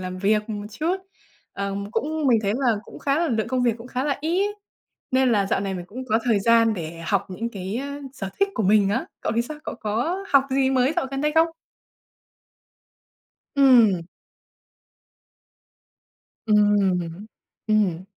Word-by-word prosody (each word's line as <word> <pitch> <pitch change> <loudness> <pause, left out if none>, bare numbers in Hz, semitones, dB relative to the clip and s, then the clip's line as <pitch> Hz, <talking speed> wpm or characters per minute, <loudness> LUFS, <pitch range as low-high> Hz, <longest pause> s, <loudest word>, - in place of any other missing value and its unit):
làm 185 0 -5
việc 210 +3 +1
một 205 -1 -5
chút. 320 - -1 0.6
Ờm, 200 +1 -4
cũng 310 +3 -1
mình 235 -3 +5
thấy 200 - +1
là 245 -5 +2
cũng - - -12
khá 280 +1 0
là 340 0 +1
lượng 220 -3 -1
công 255 -1 0
việc 240 -2 +3
cũng 230 - -10
khá 255 +2 -3
là 285 -2 0
ít, 385 +6 0 0.5
nên 260 0 +3
là 200 -2 +2
dạo - - 0
này 195 -1 -3
mình 180 -1 -5
cũng 255 +7 -7
có 220 +1 +3
thời 225 -5 +2
gian 230 0 +4
để 165 -2 -6
học 200 -1 +1
những 225 +6 -3
cái, 195 +1 -5
a, 280 +1 -5
sở 195 -8 -5
thích 395 - +4
của 220 - -1
mình 200 0 +4
á. 230 +6 -1
Cậu - - -2
thì 235 - +3
sao? 300 +5 -8
Cậu - - -4
có 250 - -1
học 275 -1 +6
gì 265 0 +2
mới 260 +1 +2
dạo 345 - 0
gần 270 0 -3
đây 300 +1 +1
không? 325 +1 +5 2.1
Ừm. 235 -10 +5 2.4
Ừm. 200 -4 +2 0.4
Ừm. 200 -5 +1
225 Hz, 175 wpm, -23 LUFS, 200-270 Hz, 2.4 s, học